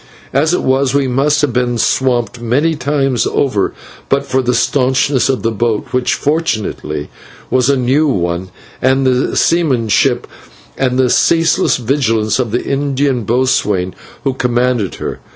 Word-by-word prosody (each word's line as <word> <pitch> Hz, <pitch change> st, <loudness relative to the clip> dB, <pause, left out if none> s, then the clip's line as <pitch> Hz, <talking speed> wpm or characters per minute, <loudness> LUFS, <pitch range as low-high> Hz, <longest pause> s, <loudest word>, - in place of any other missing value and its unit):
As 150 Hz, +4 st, +2 dB
it 180 Hz, -, 0 dB
was 135 Hz, +1 st, +1 dB
we 140 Hz, -2 st, +2 dB
must 140 Hz, +4 st, +1 dB
have 140 Hz, -5 st, +1 dB
been 125 Hz, -1 st, 0 dB
swamped 120 Hz, 0 st, 0 dB
many 140 Hz, +8 st, +1 dB
times 135 Hz, -3 st, 0 dB
over 105 Hz, -8 st, 0 dB, 0.4 s
but 140 Hz, 0 st, +1 dB
for 130 Hz, -1 st, 0 dB
the 125 Hz, -1 st, 0 dB
staunchness 130 Hz, +1 st, +1 dB
of 130 Hz, -, -1 dB
the 115 Hz, -, +1 dB
boat, 110 Hz, 0 st, -1 dB
which, 125 Hz, -1 st, +1 dB
fortunately, 110 Hz, -, -2 dB, 0.4 s
was 130 Hz, 0 st, +2 dB
a 140 Hz, -, +3 dB
new 130 Hz, +5 st, +2 dB
one, 90 Hz, -6 st, -1 dB, 0.3 s
and 130 Hz, +1 st, +2 dB
the 130 Hz, 0 st, +1 dB
seamanship 130 Hz, -, +2 dB, 0.5 s
and 130 Hz, -1 st, 0 dB
ceaseless 165 Hz, +2 st, +2 dB
vigilance 115 Hz, -4 st, 0 dB
of 125 Hz, -3 st, 0 dB
the 120 Hz, +3 st, -2 dB
Indian 140 Hz, -3 st, -1 dB
boatswain 105 Hz, -6 st, 0 dB, 0.3 s
who 135 Hz, -2 st, 0 dB
commanded 125 Hz, -5 st, 0 dB
her. -, -, -5 dB
130 Hz, 145 wpm, -15 LUFS, 120-140 Hz, 0.5 s, a